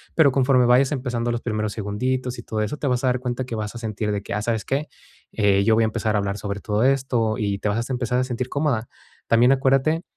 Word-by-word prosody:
Pero, 145 Hz, -5 st, +5 dB
conforme 130 Hz, -1 st, +3 dB
vayas 125 Hz, +3 st, +4 dB
empezando 120 Hz, -3 st, -2 dB
los 120 Hz, 0 st, -2 dB
primeros 110 Hz, -3 st, -2 dB
segunditos 125 Hz, +4 st, -2 dB
y 120 Hz, -, -8 dB
todo 110 Hz, -1 st, -3 dB
eso, 105 Hz, +8 st, -2 dB
te 145 Hz, -, -3 dB
vas 125 Hz, 0 st, 0 dB
a -, -, +2 dB
dar 125 Hz, 0 st, +1 dB
cuenta 125 Hz, 0 st, -3 dB
que 120 Hz, -2 st, -5 dB
vas 105 Hz, +1 st, -4 dB
a -, -, -5 dB
sentir 110 Hz, -1 st, -3 dB
de 100 Hz, 0 st, -3 dB
que, -, -, -5 dB
ah, 105 Hz, -, -1 dB
¿sabes 115 Hz, -1 st, -1 dB
qué?, 140 Hz, +3 st, -1 dB, 0.5 s
eh, 100 Hz, -1 st, +3 dB
yo 110 Hz, 0 st, +4 dB
voy 115 Hz, -, +3 dB
a -, -, +3 dB
empezar 110 Hz, 0 st, -1 dB
a -, -, +3 dB
hablar 100 Hz, 0 st, -2 dB
sobre 100 Hz, -1 st, -5 dB
todo 105 Hz, +1 st, 0 dB
esto, 125 Hz, -5 st, +1 dB
y 100 Hz, -3 st, -1 dB
te -, -, -2 dB
vas 115 Hz, +4 st, -2 dB
a 130 Hz, -, -1 dB
empezar 125 Hz, 0 st, -1 dB
a 130 Hz, -, +2 dB
sentir 125 Hz, 0 st, -3 dB
cómoda. 140 Hz, -6 st, -1 dB, 0.4 s
También 120 Hz, +3 st, +5 dB
acuérdate 135 Hz, +5 st, +2 dB
120 Hz, 260 wpm, -23 LUFS, 110-130 Hz, 0.5 s, Pero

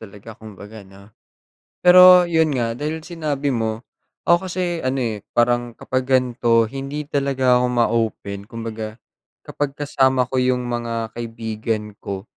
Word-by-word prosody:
talaga 105 Hz, +1 st, -12 dB
kumbaga 110 Hz, 0 st, -12 dB
'no. 100 Hz, +2 st, -17 dB, 0.7 s
Pero 180 Hz, 0 st, +9 dB
yun 160 Hz, -2 st, +2 dB
nga, 115 Hz, -2 st, -1 dB
dahil 155 Hz, +5 st, -4 dB
sinabi 150 Hz, -5 st, -2 dB
mo, 115 Hz, 0 st, -3 dB, 0.4 s
ako 175 Hz, +2 st, +3 dB
kasi 175 Hz, -1 st, -2 dB
ano 130 Hz, +1 st, -1 dB
eh, 115 Hz, -4 st, -2 dB, 0.2 s
parang 120 Hz, 0 st, +1 dB
kapag 130 Hz, 0 st, -3 dB
gan'to 120 Hz, -3 st, +2 dB
hindi 140 Hz, +2 st, -5 dB
talaga 135 Hz, -3 st, +1 dB
ako 125 Hz, -, +1 dB
ma-open 115 Hz, -4 st, -1 dB
kumbaga 110 Hz, -2 st, -6 dB, 0.5 s
kapag 145 Hz, -1 st, -3 dB
kasama 130 Hz, -3 st, +1 dB
ko 130 Hz, -, +1 dB
yung 125 Hz, 0 st, +1 dB
mga 115 Hz, -2 st, -3 dB
kaibigan 110 Hz, -2 st, -4 dB
ko 95 Hz, -1 st, -6 dB
120 Hz, 135 wpm, -21 LUFS, 115-140 Hz, 0.7 s, Pero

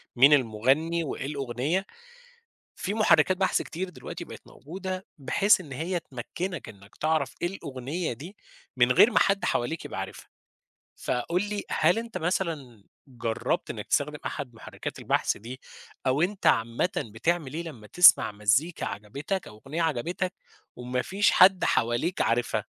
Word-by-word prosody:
مين 135 Hz, +4 st, +7 dB
المغني 135 Hz, +7 st, +2 dB
وإيه 135 Hz, -3 st, -4 dB
الأغنية، 140 Hz, +6 st, -2 dB, 0.9 s
في 200 Hz, -, -3 dB
محركات 185 Hz, -4 st, +4 dB
بحث 190 Hz, -, +2 dB
كتير 185 Hz, +3 st, -5 dB
دلوقتي -, -, -8 dB
بقت -, -, -10 dB
موجودة 185 Hz, +6 st, -6 dB
بحيث 190 Hz, +8 st, +3 dB
إن 145 Hz, -6 st, -12 dB
هي 170 Hz, +6 st, -2 dB
تمكّنك 165 Hz, +5 st, -6 dB
إنّك 100 Hz, 0 st, -15 dB
تعرف 155 Hz, 0 st, 0 dB
إيه 175 Hz, -, +1 dB
الأغنية 150 Hz, -2 st, -4 dB
دي، 165 Hz, -, -10 dB, 0.4 s
من 125 Hz, 0 st, +4 dB
غير 215 Hz, -, +6 dB
ما -, -, +4 dB
حد 195 Hz, 0 st, +2 dB
حواليك 135 Hz, +7 st, -1 dB
يبقى -, -, -5 dB
عارفها، -, -, -7 dB, 0.7 s
فقُل 170 Hz, +9 st, -1 dB
لي 205 Hz, -1 st, -3 dB
هل -, -, +3 dB
أنت 230 Hz, 0 st, -6 dB
مثلًا 160 Hz, -, -2 dB, 0.2 s
جرّبت 115 Hz, -3 st, -2 dB
إنّك -, -, -6 dB
تستخدم -, -, 0 dB
أحد -, -, -5 dB
محرّكات -, -, -7 dB
البحث -, -, 0 dB
دي 125 Hz, +5 st, -9 dB, 0.5 s
أو 130 Hz, +4 st, +2 dB
أنت 195 Hz, +3 st, 0 dB
عامةً 115 Hz, +9 st, +2 dB
بتعمل 135 Hz, +7 st, -1 dB
إيه 165 Hz, +2 st, -3 dB
لمّا 120 Hz, -11 st, -10 dB
تسمع 180 Hz, -5 st, +7 dB
مزّيكا 120 Hz, +11 st, +1 dB
عجبتك 140 Hz, -, -4 dB
أو 105 Hz, 0 st, -13 dB
أغنية 155 Hz, +5 st, -3 dB
عجبتك 170 Hz, +5 st, -1 dB, 0.4 s
وما 125 Hz, +1 st, -2 dB
فيش 200 Hz, +7 st, +2 dB
حد 185 Hz, 0 st, +6 dB
حواليك 120 Hz, +10 st, +1 dB
عارفها؟ 120 Hz, +1 st, 0 dB
155 Hz, 145 wpm, -27 LUFS, 125-180 Hz, 0.9 s, مين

